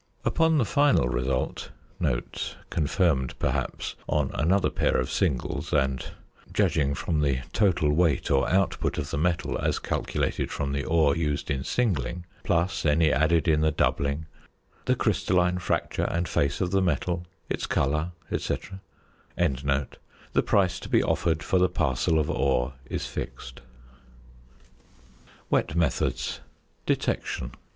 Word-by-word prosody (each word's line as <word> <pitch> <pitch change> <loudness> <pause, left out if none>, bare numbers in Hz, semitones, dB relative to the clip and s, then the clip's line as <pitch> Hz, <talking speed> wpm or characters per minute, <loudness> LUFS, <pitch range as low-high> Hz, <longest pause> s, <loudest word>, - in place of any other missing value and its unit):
Upon 160 -1 +3
the 130 - +3
final 145 - +3
result 65 0 -2 1.0
(confirmed 75 -4 +1
perhaps - - -2 0.2
on - - +1
another 95 +6 +2
pair - - +1
of 65 - -1
singles, 75 -10 -1
and, 65 -3 +1 0.5
judging 70 -2 +2
from 75 +2 -1
the 70 -3 +1
total 85 -8 +3
weight 80 -4 +2
or 70 -1 +3
output 95 0 +1
of - - -3
the - - -1
metal 85 +1 0
as - - 0
calculated - - -2
from 70 -1 -2
the 70 0 -1
ore 80 -3 +3
used 75 -3 -1
in 65 -2 -1
"singling," 85 - -1 0.2
plus 85 +4 +1
any 80 +1 +3
added 80 +4 +2
in 75 -1 +3
the 80 - +4
"doubling," 70 0 0 0.6
the - - +3
crystalline 90 0 +1
fracture - - -1
and 85 0 -1
face 70 -2 0
of 90 -1 0
the 95 0 +3
metal, 90 -1 -1 0.2
its - - -2
colour, 75 +5 0 0.2
etc.) 95 -1 -3 0.6
the 70 0 -1
price 95 -3 +2
to - - -9
be - - +4
offered 80 -1 0
for 95 - +2
the 90 0 +4
parcel 80 -1 +1
of 75 -2 +1
ore 65 -1 +1
is - - -3
fixed. 65 0 -7 1.9
WET - - +1
METHODS. 80 -6 0 0.5
~Detection. 65 +1 -1
80 Hz, 135 wpm, -27 LUFS, 70-90 Hz, 1.9 s, the